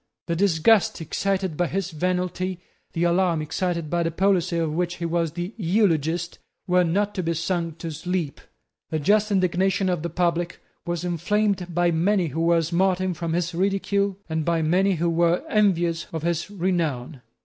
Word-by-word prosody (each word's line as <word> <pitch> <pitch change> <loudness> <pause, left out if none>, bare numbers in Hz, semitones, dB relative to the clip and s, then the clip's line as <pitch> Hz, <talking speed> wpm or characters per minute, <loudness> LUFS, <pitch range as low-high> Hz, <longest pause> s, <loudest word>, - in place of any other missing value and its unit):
The 170 - -1
disgust 195 +3 +3
excited 190 +2 -1
by 175 +2 +1
his 195 +1 -2
venality, 180 +2 -2 0.3
the 170 - 0
alarm 175 -1 +2
excited 170 +1 -2
by 170 +3 0
the 165 - +1
policy 180 0 +1
of 160 -2 0
which 175 +2 -1
he 170 - -4
was 165 -2 0
the 175 +4 -4
eulogist, 175 -4 +1 0.3
were 180 0 +3
not 200 +5 0
to 185 - -2
be 165 -1 -1
sung 165 0 -1
to 165 0 -6
sleep. 160 -1 -3 0.5
The 160 - -1
just 205 +7 +2
indignation 185 0 +1
of 175 -3 0
the 170 - -3
public 175 0 -1 0.3
was 175 0 -2
inflamed 185 +2 0
by 175 0 +3
many 175 +1 +1
who 160 +4 -3
were 165 0 +3
smarting 185 +2 +1
from 170 -1 -3
his 175 0 -1
ridicule, 195 +1 0
and 160 -1 -1
by 165 0 +1
many 185 +4 +2
who 170 +1 0
were 170 +1 +2
envious 175 -6 +1
of 160 -2 -4
his 170 +2 -1
renown. 165 -9 -2
175 Hz, 170 wpm, -24 LUFS, 165-185 Hz, 0.5 s, disgust